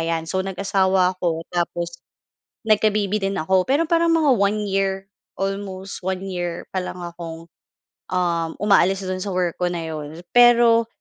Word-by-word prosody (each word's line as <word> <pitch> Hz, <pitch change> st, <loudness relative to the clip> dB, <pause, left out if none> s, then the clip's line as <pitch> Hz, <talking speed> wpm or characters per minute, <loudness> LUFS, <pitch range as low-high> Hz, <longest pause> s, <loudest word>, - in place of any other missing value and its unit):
ayan. 165 Hz, 0 st, -1 dB
So, 190 Hz, +3 st, -2 dB
nag-asawa 190 Hz, -1 st, +1 dB
ako 165 Hz, -3 st, -2 dB
tapos 175 Hz, -1 st, -3 dB, 0.6 s
nagka-baby 215 Hz, -1 st, +2 dB
din 195 Hz, 0 st, -2 dB
ako. 185 Hz, +2 st, +1 dB
Pero 285 Hz, +5 st, +3 dB
parang 335 Hz, +1 st, +2 dB
mga 305 Hz, -4 st, +3 dB
1 205 Hz, +1 st, +1 dB
year, 195 Hz, 0 st, -1 dB, 0.2 s
almost 195 Hz, 0 st, -4 dB
1 190 Hz, +1 st, -3 dB
year 175 Hz, -3 st, -4 dB
pa 190 Hz, -, -1 dB
lang 180 Hz, -1 st, -6 dB
akong, 165 Hz, -1 st, -8 dB, 0.6 s
uhm, 170 Hz, -2 st, 0 dB
umaalis 195 Hz, -1 st, +3 dB
do'n 185 Hz, 0 st, -3 dB
sa 190 Hz, 0 st, -4 dB
work 180 Hz, -2 st, -1 dB
ko 180 Hz, -, 0 dB
na 170 Hz, -2 st, -3 dB
'yon. 155 Hz, +2 st, -7 dB
Pero 235 Hz, -1 st, +6 dB
190 Hz, 155 wpm, -22 LUFS, 175-200 Hz, 0.6 s, Pero